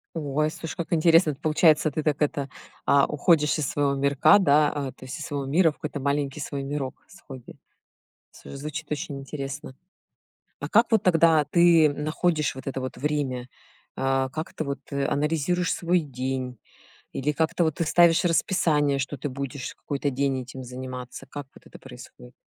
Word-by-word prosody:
Ой, 155 0 -1
слушай, 165 +1 -7
как 170 -1 -4
интересно. 165 0 +5
Это 140 - -10
получается, 155 0 +4
ты 155 +2 -3
так 150 -1 0
это, 145 -2 0 0.4
а, 140 -1 +5
уходишь 150 0 +2
из 150 -3 -1
своего 140 -1 0
мирка, 140 +4 +4
да, 150 -4 +4
а, 140 -3 -4
то 130 - -14
есть 130 - -7
из 155 - -5
своего 145 -3 -4
мира 160 +4 +3
в - - -15
какой-то 150 -1 -5
маленький 140 +1 -1
свой 140 -1 -4
мирок 135 -1 -5
с 190 - -17
хобби. 130 -3 -11 0.7
Всё, - - -12
звучит 150 +2 -6
очень 145 -1 -4
интересно. 135 0 -7 0.8
А - - -5
как 230 +2 +4
вот 220 - +4
тогда 165 -4 +4
ты 170 -2 +5
находишь 155 +2 -1
вот 130 0 -10
это 135 0 -3
вот 130 0 -6
время? 135 -4 -2 0.5
А, 135 0 0
как 155 +4 -6
ты 160 - -3
вот, 140 -1 -4
э, 140 0 -1
анализируешь 165 +4 0
свой 175 +1 +1
день? 130 -3 -4 0.5
Или 145 +3 -1
как-то 160 +3 0
вот 160 -2 0
ты 170 - -1
ставишь 170 +1 +4
расписание, 155 -5 +2
что 135 +2 -3
ты 145 +3 -4
будешь 135 0 -5
какой-то 145 0 -3
день 135 0 0
этим 130 +1 -9
заниматься? 125 0 -8
Как 145 -2 -7
вот - - -18
это - - -14
происходит? 60 0 -13
145 Hz, 180 wpm, -25 LUFS, 135-160 Hz, 0.8 s, интересно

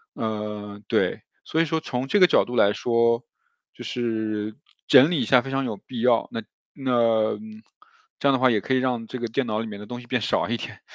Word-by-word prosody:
嗯， 105 -1 -5
对。 - - 0 0.2
所 160 - +1
以 - - +2
说 160 +1 -1
从 130 -4 -4
这 205 - +2
个 180 - +8
角 - - +4
度 125 - -6
来 100 -3 +5
说， 115 +1 +1 0.5
就 - - -10
是 110 -3 -3 0.3
整 140 +2 +7
理 165 - +1
一 - - 0
下 125 -2 +5
非 135 - -8
常 135 0 0
有 110 - -3
必 120 +4 -8
要。 120 -1 +3
那 115 -1 -4 0.3
那 115 -5 +2 0.9
这 - - +1
样 135 - +4
的 - - +3
话 130 -1 +4
也 105 -3 +1
可 130 - -2
以 130 - +4
让 125 -3 -1
这 130 - -6
个 120 - -2
电 125 +3 -1
脑 110 -1 -1
里 115 - -3
面 105 -2 -8
的 105 - -9
东 120 0 -6
西 120 - -14
变 125 -2 0
少 105 - 0
一 120 - 0
点， - - -8
120 Hz, 250 characters per minute, -24 LUFS, 110-130 Hz, 0.9 s, 个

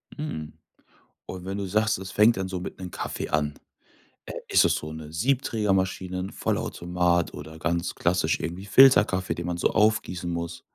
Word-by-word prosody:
Mhm. 80 - -5 0.7
Und 95 -1 -8
wenn 95 +1 -4
du 100 - -3
sagst, 105 +3 +1
es 95 0 -7
fängt 105 +1 +4
dann 95 - -2
so 95 -1 -4
mit 90 - -7
'nem 90 -1 -7
Kaffee - - -4
an, 75 -1 0 0.7
äh, - - -7
ist - - +5
es - - +3
so 75 - -5
'ne 80 -1 -9
Siebträgermaschine, 95 -4 0
'n 95 +2 -4
Vollautomat 85 -1 0
oder 80 +2 -9
ganz 85 +2 -1
klassisch 85 -2 +1
irgendwie 90 +4 -5
Filterkaffee, 100 -5 +5
den 85 0 -5
man 90 -1 -2
so - - +2
aufgießen 105 -5 +1
muss? 85 0 -4
90 Hz, 175 wpm, -26 LUFS, 85-100 Hz, 0.7 s, ist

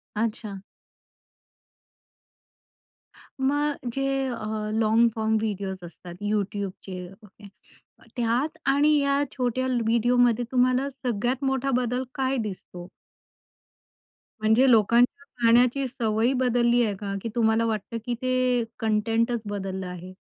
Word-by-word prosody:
अच्छा. 215 -2 -3 2.8
मग 290 +2 +1 0.2
जे 270 +1 -2 0.2
अ, 245 - -3 0.4
लॉन्ग 225 +1 +4
फॉर्म 220 0 +1
व्हिडिओज 200 -3 -3
असतात 175 +1 -10
YouTubeचे 200 -3 -3 0.2
ओके 205 0 -15 0.7
त्यात 250 +6 0
आणि 290 +3 +4
या 280 0 +2
छोट्या 255 0 -1
ल 250 -2 0
व्हिडिओमध्ये 240 +1 +3
तुम्हाला 255 +2 +2
सगळ्यात 250 0 -2
मोठा 265 0 0
बदल 250 +1 0
काय 265 0 0
दिसतो? 185 -5 -6 1.5
म्हणजे 220 +5 +4
लोकांच्या 235 +5 +3 0.2
पाहण्याची 245 +3 +4
सवय 230 -1 0
बदलली 240 -1 +3
आहे 210 -3 -1
का? 200 0 -5
की 230 - -3
तुम्हाला 225 -1 +2
वाटतं 220 0 -3
की 245 - -1
ते 255 -1 +1 0.2
कंटेंटच 225 +2 +1
बदललं 195 -2 -4
आहे? 180 +1 -8
235 Hz, 110 wpm, -25 LUFS, 210-255 Hz, 2.8 s, लॉन्ग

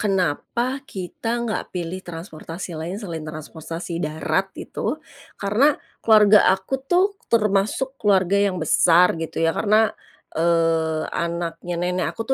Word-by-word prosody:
kenapa 210 - -1
kita 195 -2 -6 0.2
nggak 215 - -3
pilih 180 +1 -4
transportasi 165 0 -7
lain 165 +5 -4
selain 170 -7 -6
transportasi 160 +2 -6
darat 155 +5 -1
itu, - - -3 0.4
karena 230 +9 +3 0.2
keluarga 215 -2 +7 0.2
aku 190 +7 -5 0.2
tuh, 380 +3 +3 0.2
termasuk 215 +4 +1
keluarga 195 -2 +3
yang 185 -2 -2
besar, 175 +2 +4
gitu 165 - -5
ya. 165 - +1
Karena, 215 +1 +3 0.4
eee, 165 -1 +2 0.2
anaknya 170 0 -3
nenek 180 +1 0
aku - - -11
180 Hz, 120 wpm, -22 LUFS, 165-210 Hz, 0.4 s, keluarga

